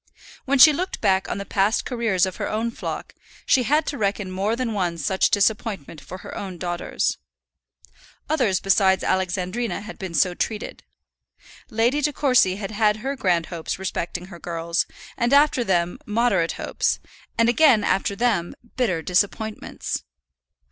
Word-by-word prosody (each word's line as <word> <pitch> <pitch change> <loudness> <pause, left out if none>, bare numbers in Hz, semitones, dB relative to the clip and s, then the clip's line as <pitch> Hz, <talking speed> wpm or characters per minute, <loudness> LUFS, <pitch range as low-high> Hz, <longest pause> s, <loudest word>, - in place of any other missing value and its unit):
When 280 +1 +2
she 305 +3 +9
looked 365 +6 -3
back 190 0 +2
on - - -2
the 200 - -5
past 200 +3 +1
careers 225 -7 +1
of 185 - -6
her - - -3
own 225 +2 -1
flock, - - -6 0.3
she 265 - +4
had 300 +5 +2
to 280 - -4
reckon 200 -2 -1
more 195 +4 0
than 235 -2 -2
one 180 -4 -1
such 190 +5 +1
disappointment 200 - 0
for 180 +6 -9
her - - -7
own 190 -3 -6
daughters. 175 0 -2 1.1
Others 250 -11 +1
besides 190 -1 +3
Alexandrina 190 +5 -1
had 210 +2 -10
been 185 -3 -5
so 180 +4 +3
treated. 210 +4 -4 0.9
Lady 235 +6 +1
De 295 +1 +1
Courcy 250 -10 +3
had 195 0 -5
had 210 0 +2
her 275 +1 -1
grand 175 -9 +1
hopes 165 -2 -4
respecting 180 -2 -4
her 170 - -10
girls, 170 0 -1 0.3
and 240 +3 +1
after 285 -3 +4
them 175 -4 0
moderate 210 -6 +1
hopes, - - -1 0.4
and 230 - +4
again 240 -3 +5
after 200 0 +1
them 205 -6 0 0.2
bitter 185 -11 0
disappointments. 205 +4 -1
205 Hz, 155 wpm, -23 LUFS, 185-235 Hz, 1.1 s, she